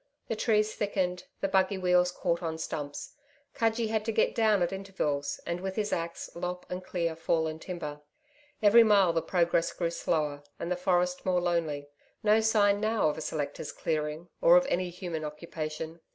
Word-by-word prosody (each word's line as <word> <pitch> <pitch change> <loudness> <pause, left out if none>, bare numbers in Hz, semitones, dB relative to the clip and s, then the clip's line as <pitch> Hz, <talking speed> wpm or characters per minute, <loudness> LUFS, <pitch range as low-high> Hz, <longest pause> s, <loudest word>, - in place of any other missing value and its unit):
The 225 - 0
trees 215 -1 +2
thickened, 185 -3 -1 0.2
the 195 - +1
buggy 190 0 +2
wheels 180 -1 +3
caught 170 -1 -1
on 160 -2 -3
stumps. 145 -2 -5 0.4
Cudgee 225 0 +1
had 220 -1 0
to 225 - 0
get 220 - +2
down 215 -5 +3
at 175 - -1
intervals 150 -8 -2
and, 170 +1 -3
with 190 0 -4
his 210 -1 -1
axe, 170 0 -3
lop 180 +1 -4
and 180 +1 -4
clear 170 -3 -2
fallen 160 -1 0
timber. 155 -5 -6 0.6
Every 215 +3 +8
mile 200 -5 +5
the 165 - +1
progress 170 0 +1
grew 170 -2 -2
slower 150 -4 -1 0.2
and 170 - -4
the - - +2
forest 180 0 +1
more 185 -1 +2
lonely. 165 -5 -1 0.4
No 215 +1 +5
sign 210 -2 +3
now 215 -5 +2
of 150 - -3
a - - -5
selector's 150 -1 -4
clearing, 155 +1 -2
or 170 +1 +8
of 180 - +3
any 180 0 0
human 175 -3 -5
occupation.... 155 +1 -5
180 Hz, 180 wpm, -29 LUFS, 160-195 Hz, 0.6 s, Every